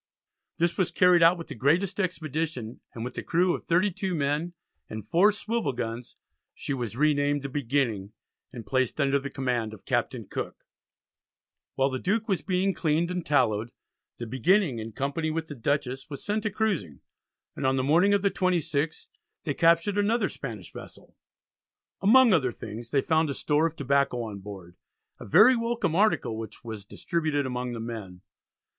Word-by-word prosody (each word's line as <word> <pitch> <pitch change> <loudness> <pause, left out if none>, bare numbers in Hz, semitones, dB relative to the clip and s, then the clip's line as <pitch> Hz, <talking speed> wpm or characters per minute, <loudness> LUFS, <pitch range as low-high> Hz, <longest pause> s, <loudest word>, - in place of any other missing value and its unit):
This 170 +2 0
was 185 - +2
carried 180 -1 +4
out 170 +2 +6
with 170 - -7
the - - -6
greatest 165 - +1
expedition, 155 - -3 0.2
and 115 0 -4
with 125 - -6
a - - -3
crew 175 +1 +2
of - - -5
32 185 +1 +1
men 150 +3 -1 0.4
and 110 -1 -7
four 185 - +5
swivel 210 - -2
guns, 120 0 -5 0.4
she 145 - -4
was 120 -3 -4
renamed 145 -1 +2
the 140 - -4
Beginning 120 -7 -1 0.4
and 120 -4 -8
placed 130 +1 0
under 140 -1 +3
the 140 +1 -6
command 125 -5 -2
of 100 - -20
Captain - - -1
Cooke. - - -6 1.1
While 135 +1 +2
the 130 - -3
Duke 215 - 0
was 190 -7 0
being 190 +1 0
cleaned 165 +1 0
and 180 -1 -2
tallowed, 120 -6 +1 0.4
the 120 - -5
Beginning 130 - +2
in 110 +1 -6
company 140 +7 -2
with 160 +1 -2
the 155 - -8
Dutchess 135 +1 -2
was 140 - -8
sent 210 +1 -1
a - - +2
cruising, 190 - -2 0.5
and - - -1
on 130 - +2
the 130 - 0
morning 175 +9 +4
of 200 - 0
the 200 - +3
26th 165 -4 -1 0.4
they 145 - -1
captured 170 +6 +3
another 210 0 +2
Spanish 110 - -8
vessel. - - -12 0.9
Among 235 +3 +6
other 130 -8 +2
things 115 +1 -8
they 140 +1 +2
found 160 0 +2
a 140 - -2
store 150 +2 +2
of 165 - -8
tobacco 140 -4 +1
on 105 -3 -6
board, 95 -3 -10 0.4
a - - -9
very 215 - +7
welcome 230 -7 -1
article 170 - +2
which 110 - -8
was 110 -4 -7
distributed 155 - -1
among 125 -1 -3
the 115 - -5
men. 110 -6 -7
145 Hz, 175 wpm, -27 LUFS, 120-180 Hz, 1.1 s, very